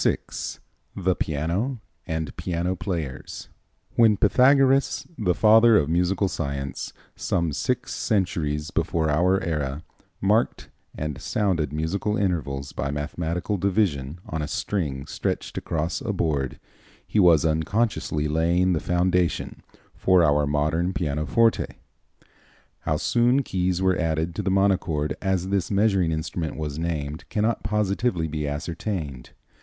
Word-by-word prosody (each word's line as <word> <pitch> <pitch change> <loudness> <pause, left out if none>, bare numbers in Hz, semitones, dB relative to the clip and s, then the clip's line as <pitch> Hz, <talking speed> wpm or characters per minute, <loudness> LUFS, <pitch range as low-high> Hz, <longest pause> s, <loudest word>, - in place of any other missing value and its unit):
VI - - +3 0.8
The 95 -1 +1
Piano 85 - -1 0.3
and 80 -2 -3
Piano 90 +1 -2
Players 80 -6 -5 0.5
When 110 -3 +5
Pythagoras, 135 +5 +4 0.3
Father 110 +1 +6
of 75 - +1
Musical 90 +3 +2
Science, 70 -5 -4 0.2
some 85 -3 -1
six 125 - -1
centuries 85 -7 -1
before 80 -2 0
our 90 +5 +3
era, 75 -2 -2 0.4
marked 105 +4 +1 0.3
and 75 -2 -4
sounded 90 -9 0
musical 90 +7 -1
intervals 70 -8 -1
by 70 - -3
mathematical 85 +7 -2
division 90 -7 0
on 80 -1 -3
a 75 - -2
string 70 -7 -2
stretched - - -3
across 80 - -2
a 120 -6 -2
board, 75 -8 -1 0.5
he 110 - 0
was 85 -5 +6
unconsciously 80 -1 0
laying 85 +4 +2
the 80 - +1
foundation 90 +2 0 0.3
for 95 -2 +4
our 75 -2 +3
modern 80 +5 0
pianoforte. 85 +8 +1 1.0
How - - -1
soon 125 +3 +2
keys 90 -3 -1
were 95 -1 +2
added 80 0 0
to 105 - -3
the 100 - -1
monochord, 90 -7 +1
as 95 -2 0
this 100 -2 0
measuring 100 -4 +2
instrument 80 +1 -3
was 75 -1 -4
named, 80 -3 -3
cannot 110 +2 0
positively 105 -4 0
be 75 -1 -3
ascertained. 75 - -4
85 Hz, 125 wpm, -25 LUFS, 75-100 Hz, 1.0 s, Father